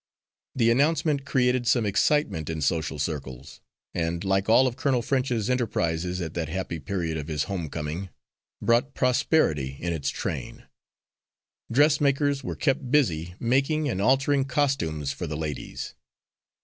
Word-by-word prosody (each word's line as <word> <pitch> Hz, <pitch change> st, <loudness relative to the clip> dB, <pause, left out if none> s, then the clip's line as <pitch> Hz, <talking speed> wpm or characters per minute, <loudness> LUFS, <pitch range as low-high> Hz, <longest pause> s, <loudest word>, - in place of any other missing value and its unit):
The 115 Hz, -2 st, +3 dB
announcement 145 Hz, +2 st, +2 dB
created 125 Hz, -2 st, +2 dB
some 120 Hz, -2 st, +3 dB
excitement 105 Hz, -, +1 dB
in 80 Hz, -1 st, -3 dB
social 80 Hz, +2 st, 0 dB
circles, 70 Hz, -3 st, -5 dB, 0.3 s
and, 85 Hz, +1 st, -2 dB
like 95 Hz, +1 st, +1 dB
all 125 Hz, +4 st, +6 dB
of 125 Hz, -2 st, -1 dB
Colonel 130 Hz, -4 st, +1 dB
French's 125 Hz, -4 st, 0 dB
enterprises 90 Hz, -8 st, -1 dB
at 80 Hz, -2 st, -4 dB
that 80 Hz, -3 st, -3 dB
happy 85 Hz, -1 st, -3 dB
period 80 Hz, +1 st, -2 dB
of 75 Hz, -1 st, -5 dB
his 75 Hz, -3 st, -1 dB
home 90 Hz, -6 st, -4 dB
coming, 80 Hz, +5 st, -4 dB, 0.5 s
brought 120 Hz, +4 st, +2 dB
prosperity 125 Hz, -, +1 dB
in 85 Hz, 0 st, -2 dB
its 70 Hz, -4 st, -2 dB
train. -, -, -5 dB, 1.1 s
Dressmakers 145 Hz, 0 st, +3 dB
were -, -, -4 dB
kept 135 Hz, -3 st, 0 dB
busy 90 Hz, -, +1 dB
making 135 Hz, +5 st, +1 dB
and 95 Hz, -8 st, -1 dB
altering 135 Hz, +4 st, +3 dB
costumes 130 Hz, -, 0 dB
for 85 Hz, +6 st, -5 dB
the 75 Hz, -1 st, -4 dB
ladies. 75 Hz, -3 st, -5 dB
105 Hz, 140 wpm, -26 LUFS, 80-135 Hz, 1.1 s, all